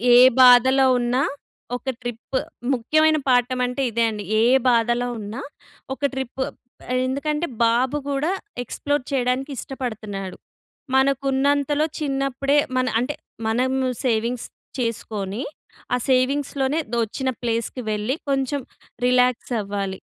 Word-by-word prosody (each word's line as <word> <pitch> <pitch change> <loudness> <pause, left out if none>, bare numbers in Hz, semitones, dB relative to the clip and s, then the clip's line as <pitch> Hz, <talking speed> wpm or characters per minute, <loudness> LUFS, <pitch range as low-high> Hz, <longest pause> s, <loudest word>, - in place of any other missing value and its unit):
ఏ - - +9 0.2
బాధలో 260 +1 +7
ఉన్నా 245 +3 +1 0.5
ఒక 255 +2 -4
ట్రిప్ 240 +2 -4 0.4
ముఖ్యమైన 310 +6 +3
పాఠం 250 0 +3
అంటే 250 +2 -3
ఇదే 230 +1 +1
అండి. 210 -2 -5 0.2
ఏ - - +4 0.2
బాధలో 240 +1 +2
ఉన్నా 215 +6 -6 0.5
ఒక 270 - -11
ట్రిప్. 265 0 -4 0.7
ఎందుకంటే 300 +5 -1 0.2
బాబు 250 +5 +2
కూడా 285 +5 0 0.3
ఎక్స్‌ప్లోర్ 290 +3 -2
చేయడానికి 260 +2 0
ఇష్టపడుతున్నాడు. 215 -8 -5 0.6
మనకున్నంతలో 275 +2 +2
చిన్నప్పుడే 275 0 0 0.2
మన 255 - +2 0.2
అంటే 285 +4 -2 0.3
మనము 260 +3 +1 0.2
సేవింగ్స్ 235 +1 0 0.3
చేసుకొని, 220 -1 -3 0.5
ఆ - - +4
సేవింగ్స్‌లోనే 275 +3 +1
దొ - - +1
వచ్చిన 260 +5 -3
ప్లేస్‍కి 230 +2 -2
వెళ్ళి 215 +5 -1 0.2
కొంచెం 270 +1 0 0.4
రిలాక్స్ 250 0 +2
అవ్వాలి. 200 -1 -4
255 Hz, 110 wpm, -23 LUFS, 235-275 Hz, 0.7 s, ఏ